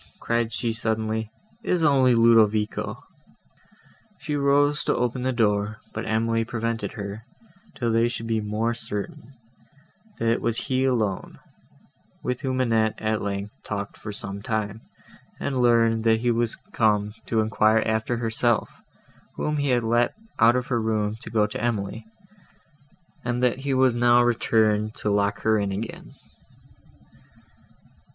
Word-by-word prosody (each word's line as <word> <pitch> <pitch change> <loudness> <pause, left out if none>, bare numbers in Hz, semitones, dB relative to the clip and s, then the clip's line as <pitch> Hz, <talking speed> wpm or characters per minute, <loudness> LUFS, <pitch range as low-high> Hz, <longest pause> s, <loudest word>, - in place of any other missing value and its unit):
cried 115 -1 0
she 115 +1 -1
suddenly, 110 -1 -1 0.3
"it - - -6
is 175 -2 +2
only 135 -5 +4
Ludovico." 110 -2 +3 1.1
She 150 - -4
rose 145 +1 +2
to - - +2
open 125 +1 -1
the 130 +1 0
door, 105 -3 +1 0.2
but 110 - -4
Emily 115 +1 +1
prevented 115 0 -3
her, 100 0 -6 0.5
till 120 -3 -1
they 115 +1 +3
should 115 -1 -5
be 115 -1 0
more 105 +3 -1
certain, 115 +3 -6 0.8
that 115 - -1
it 115 - +2
was 115 -1 0
he 130 0 0
alone; 110 -7 -1 0.9
with 125 0 -2
whom 130 -1 -1
Annette, 110 -3 +2
at 110 0 -1
length, 100 +1 -4
talked 100 -1 -5
for 110 - -7
some 100 0 -6
time, 110 0 -3 0.6
and 135 -2 -2
learned, 115 -2 +3
that 110 0 +3
he 120 0 +2
was 115 -1 0 0.2
come 105 -2 +2
to 115 - +1
enquire 110 0 +3
after 110 +2 0
herself, 115 0 0 0.5
whom 150 0 -1
he 145 -1 0
had 120 -2 +2
let 120 +2 +2 0.2
out 115 +2 +6
of 125 0 0
her 120 -3 0
room 110 -1 0
to - - -8
go 110 -2 +2
to 105 - -5
Emily, 110 -1 -2 1.2
and 125 +1 -1
that 125 +1 +2
he 135 0 -2
was 130 -2 +4
now 120 0 +5
returned 110 -2 +2
to 105 - -2
lock 100 0 +1
her 110 -1 +2
in 100 -1 -1
again. 105 +4 -6
115 Hz, 150 wpm, -25 LUFS, 110-120 Hz, 1.2 s, out